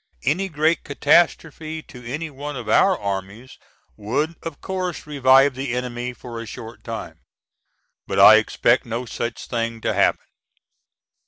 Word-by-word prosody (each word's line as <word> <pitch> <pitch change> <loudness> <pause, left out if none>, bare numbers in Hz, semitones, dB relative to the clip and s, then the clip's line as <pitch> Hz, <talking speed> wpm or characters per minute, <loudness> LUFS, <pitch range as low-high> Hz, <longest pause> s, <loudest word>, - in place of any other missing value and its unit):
Any 190 +6 0
great 155 +1 +1
catastrophe 155 +1 +1
to 125 -1 -13
any 150 +7 -5
one 145 +1 -6
of 120 -3 -7
our 190 - +4
armies 100 +5 -5 0.4
would 140 +10 -2
of 165 -3 -7
course 185 -2 -4
revive 135 -1 +4
the 130 -1 -3
enemy 125 0 -3
for 120 -1 -9
a 115 - -8
short 115 +3 -10
time. 115 -1 -7 0.9
But - - -3
I - - +10
expect - - +2
no 115 +2 -4
such 115 0 -5
thing 115 -1 -3
to - - 0
happen. - - +2
130 Hz, 145 wpm, -22 LUFS, 115-155 Hz, 0.9 s, I